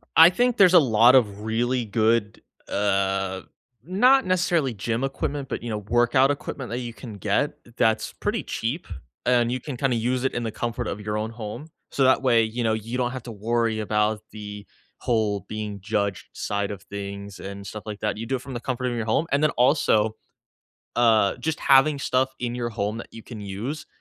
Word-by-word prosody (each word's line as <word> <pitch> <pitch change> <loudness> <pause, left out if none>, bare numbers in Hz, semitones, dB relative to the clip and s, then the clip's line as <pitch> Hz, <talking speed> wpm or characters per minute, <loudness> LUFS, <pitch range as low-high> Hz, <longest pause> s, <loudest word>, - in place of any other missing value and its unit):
I 165 +1 +10
think 245 +6 +1
there's 185 -2 +6
a 175 - +10
lot 120 -2 +5
of 105 -5 +2
really 120 +3 0
good, 110 0 +1 0.3
uh, 95 -1 0 0.4
not 250 - +4
necessarily 170 -7 +1
gym 115 +4 -2
equipment, 135 0 -3
but, - - -4
you 120 - -4
know, 105 - -2
workout 120 +5 +3
equipment 135 -2 -5
that 120 - -3
you 120 -2 -5
can 110 +1 -9
get 100 - 0 0.2
that's 110 0 +1
pretty 210 +2 -2
cheap, 135 +10 -3 0.4
and 120 -1 +3
you 125 - -1
can 135 0 -6
kinda 130 -1 +1
use 125 +3 0
it 135 - 0
in 120 - -2
the 115 - -2
comfort 120 +2 -3
of 105 - -4
your 105 0 -3
own 110 +1 -3
home, 115 +5 -7 0.3
so, 135 - +2
that 130 - +4
way, 120 -3 +4
you 115 +2 -2
know, 110 - +2
you 115 +3 -3
don't 125 -1 0
have 130 -3 -6
to 120 - -7
worry 115 +1 0
about 105 0 0
the 105 -1 -8 0.3
whole 110 -4 0
being 105 -2 -5
judged 100 -1 -2
side 100 0 -2
of 100 -1 -8
things, 100 0 -7
and 100 0 -7
stuff 105 +2 -7
like 105 -1 -6
that, 105 -1 -1
you 115 - -5
do 130 +3 -1
it 125 - -4
from 135 0 -8
the 120 - -3
comfort 130 0 -3
of 120 - -1
your 115 - -2
home, 115 +8 +1
and 140 +1 +2
then 155 - +4
also, 115 -5 +3 0.8
uh, 110 -4 +4
just 160 0 -3
having 140 +2 +5
stuff 130 0 0
in 120 -1 -2
your 120 -1 -2
home 105 +1 -3
you 115 - -11
can 115 -4 -9
use, 105 +10 -5
115 Hz, 205 wpm, -24 LUFS, 105-130 Hz, 0.8 s, I